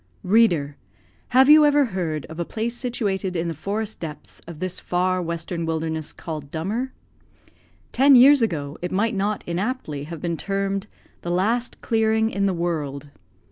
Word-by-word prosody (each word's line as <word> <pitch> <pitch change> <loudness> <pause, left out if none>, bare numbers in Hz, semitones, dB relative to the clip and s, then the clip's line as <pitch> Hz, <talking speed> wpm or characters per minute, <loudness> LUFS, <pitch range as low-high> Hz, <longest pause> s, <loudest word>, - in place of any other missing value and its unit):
Reader! 175 -9 +3 0.5
have 260 +2 +5
you 305 +1 +8
ever 290 -1 +4
heard 175 - -3
of 160 +1 -10
a - - +1
place 225 +6 -3
situated 205 -7 -2
in 170 0 -1
the 165 - -2
forest 205 +7 -4
depths 155 -3 -8
of 170 -3 -9
this 185 0 -2
far 185 +1 0
western 170 0 -3
wilderness, 160 -1 -2
called 155 -4 -7
Dummer? 210 - -3 1.0
Ten 275 +2 +6
years 270 +2 +8
ago, 150 -9 -2
it 180 - -3
might 210 +4 +1
not 205 +1 -1
inaptly 175 - -3
have 165 +1 -7
been 170 +1 -2
termed 195 +1 -2 0.3
"The 175 - -5
last 220 +8 0
clearing 220 0 +1
in 200 0 0
the - - +1
world." 145 -5 -3
185 Hz, 160 wpm, -23 LUFS, 165-225 Hz, 1.0 s, you